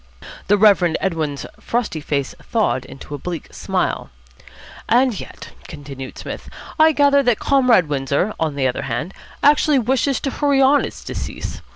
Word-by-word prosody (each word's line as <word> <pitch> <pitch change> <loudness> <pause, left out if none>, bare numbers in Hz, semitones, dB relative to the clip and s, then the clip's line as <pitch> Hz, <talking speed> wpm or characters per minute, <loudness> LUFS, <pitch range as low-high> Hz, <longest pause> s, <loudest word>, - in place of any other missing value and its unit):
The 205 - +4
Reverend 190 -5 +4
Edwin's 155 -6 -2
frosty 230 -10 -2
face 140 -2 -2
thawed 210 - 0
into 140 - -11
a 145 - -5
bleak 170 +1 -6
smile. - - -2 0.8
"And 245 -2 +3
yet," - - -10 0.2
continued 135 -2 -9
Psmith, - - -7 0.3
"I 315 0 +7
gather 285 -1 +4
that 245 -5 +2
Comrade 250 - +3
Windsor, 140 +7 -1
on 155 -3 -1
the 135 -2 +1
other 125 - -2
hand, 175 +6 -4 0.3
actually 295 0 +4
wishes 260 +2 +1
to 275 - -2
hurry 285 -1 +1
on 275 +2 +4
its - - -9
decease. - - -6
205 Hz, 155 wpm, -20 LUFS, -, 0.8 s, I